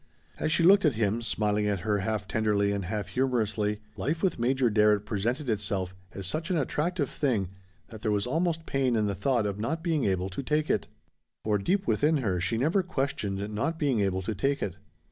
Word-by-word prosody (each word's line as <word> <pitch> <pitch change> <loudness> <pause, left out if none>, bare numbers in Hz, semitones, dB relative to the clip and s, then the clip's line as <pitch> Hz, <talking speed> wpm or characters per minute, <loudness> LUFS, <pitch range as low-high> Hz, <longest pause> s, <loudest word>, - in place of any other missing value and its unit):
As 155 - 0
she 170 +1 +3
looked 195 +3 +7
at 150 -7 +3
him, 110 +1 0
smiling 105 -2 0
at 100 -3 0
her 105 +2 0
half 105 0 -2
tenderly 105 -2 +1
and 100 -2 -2
half 105 0 -3
humorously, 110 -5 0
life 150 - -2
with 190 - +1
Major 125 0 +2
Darrett 105 -1 +3
presented 120 +7 -2
itself 100 -4 -1 0.2
as 95 - -6
such 155 - -2
an 180 - +1
attractive 150 +2 0
thing 115 -12 0 0.4
that 110 -2 -10
there 110 - -1
was 105 -1 +1
almost 165 +4 0
pain 130 -3 +1
in 110 -1 +2
the 100 - 0
thought 120 0 +1
of 100 0 -3
not 160 +9 -2
being 160 -6 +1
able 95 -1 0
to 95 - -4
take 150 +3 0
it. 105 - 0 0.6
For 105 -1 +1
deep 190 - 0
within 155 -2 +2
her 100 -9 0
she 90 +6 0
never 160 - +2
questioned 110 - -2
not 140 +10 -1
being 140 -7 +1
able 95 -2 0
to 110 - -2
take 135 +8 0
it. 100 - -4
110 Hz, 205 wpm, -28 LUFS, 100-145 Hz, 0.6 s, looked